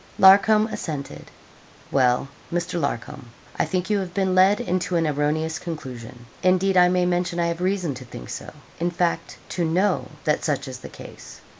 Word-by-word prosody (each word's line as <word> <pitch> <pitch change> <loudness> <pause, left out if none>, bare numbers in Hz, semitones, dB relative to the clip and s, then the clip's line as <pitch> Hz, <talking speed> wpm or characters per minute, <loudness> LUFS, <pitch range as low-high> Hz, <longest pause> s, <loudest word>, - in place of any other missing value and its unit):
Larcom 205 +2 +7
assented. 150 -9 -6 0.6
'Well, 125 -1 +2 0.2
Mr. 175 0 -2
Larcom, 120 -3 -4 0.3
I - - +2
think 185 -1 -2
you 205 - +3
have 185 -2 -5
been 190 -2 +1
led 190 +3 +5
into 180 0 -1
an 165 -1 +2
erroneous 155 +2 0
conclusion. 125 -7 -8 0.2
Indeed, 185 +1 +3
I 180 -1 +6
may 180 0 +2
mention 175 0 0
I 170 - +2
have 170 +1 -4
reason 185 -5 0
to 130 0 -9
think 90 - -10
so - - -6 0.3
in 170 +1 +1
fact, 175 0 -1
to 175 - -2
know 180 +5 +1 0.2
that - - +1
such - - -1
is - - -7
the - - -9
case. - - -12
175 Hz, 175 wpm, -23 LUFS, 150-185 Hz, 0.6 s, Larcom